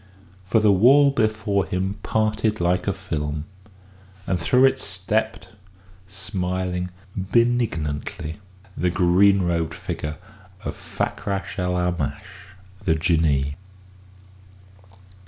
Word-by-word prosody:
For 110 +4 +3
the 105 -1 +4
wall 135 +9 +6
before 110 -5 0
him 95 +3 -2
parted 110 0 0
like 90 +2 +1
a - - +3
film, 75 -6 -4 0.8
and 90 - 0
through 125 +9 +4
it 135 0 +3
stepped, 105 +4 -2 0.6
smiling 90 -2 -3 0.3
benignantly, 95 -8 0 0.4
the 90 - +1
green 95 +2 +4
robed 85 -2 -1
figure 75 0 -5 0.5
of - - -3
Fakrash 100 0 -4
el 90 0 0
Aamash, 90 +1 -3 0.3
the 80 - +2
Jinnee. 80 -4 +1
95 Hz, 100 wpm, -23 LUFS, 85-105 Hz, 0.8 s, wall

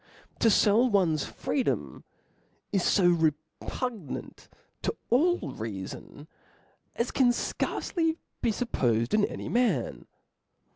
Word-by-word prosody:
To 230 - +5
fell 220 +4 +4
one's 175 -8 +2
freedom 265 - -2 0.3
* - - -41
is 195 -3 +3
fo 190 - +3
re 165 -3 +4 0.3
pugnant 225 - -5 0.3
to - - -1 0.2
all 340 +9 +4
reafon, 110 +6 -7 0.7
as 235 - -1
can 260 -2 +4
fcarce 240 - -2
be 325 -3 +1 0.3
fuppofed 120 - 0
in 215 -1 +4
any - - -6
nian. 245 0 0
210 Hz, 110 wpm, -28 LUFS, 155-250 Hz, 0.7 s, To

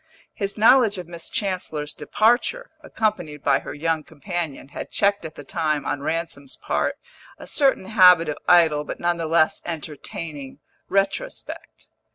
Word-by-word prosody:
His 200 0 -4
knowledge 225 -1 +5
of 180 -2 -7
Miss 170 -1 -8
Chancellor's 180 -7 -3
departure, 245 - +1
accompanied 210 - -2
by - - +3
her - - -8
young 160 +1 -1
companion, 160 -2 -5
had - - -7
checked 200 -2 +1
at 160 - -8
the 145 - -9
time, 155 -1 -1
on 140 +2 -2
Ransom's 155 -3 -3
part, - - -1 0.4
a - - -10
certain 270 -9 +2
habit 180 -5 +6
of 150 - -3
idle 160 -4 +5
but - - -7
none 175 0 0
the 165 -1 -3
less 155 0 +2
entertaining 150 -3 -6 0.3
retrospect. 200 - -3
170 Hz, 150 wpm, -23 LUFS, 150-200 Hz, 0.4 s, habit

